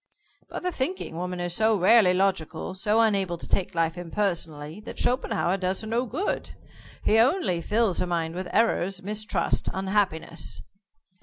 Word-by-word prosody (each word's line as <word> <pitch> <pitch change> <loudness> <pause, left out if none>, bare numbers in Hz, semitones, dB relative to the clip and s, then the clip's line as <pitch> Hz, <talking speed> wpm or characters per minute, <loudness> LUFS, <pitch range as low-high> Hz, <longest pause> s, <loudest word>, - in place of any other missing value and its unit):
"But - - -6
the 360 - 0
thinking 295 - -3
woman 180 +1 -4
is 175 -1 -2
so 220 +3 +3
rarely 200 +1 +6
logical, 185 -3 -1
so 210 +4 +2
unable 195 -6 +1
to - - -10
take 190 -2 0
life 165 +1 0
impersonally, 170 -4 -2
that - - -9
Schopenhauer 225 -7 +1
does 185 0 -1
her 220 - -7
no 235 +3 0
good. 315 - -3 0.5
He 220 - +4
only 245 - +2
fills 210 +1 +1
her 180 - 0
mind 165 -2 -1
with 185 +1 -5
errors, 195 -4 +1
mistrust, 210 0 -1
unhappiness." 190 -5 -1
190 Hz, 155 wpm, -26 LUFS, 175-220 Hz, 0.5 s, rarely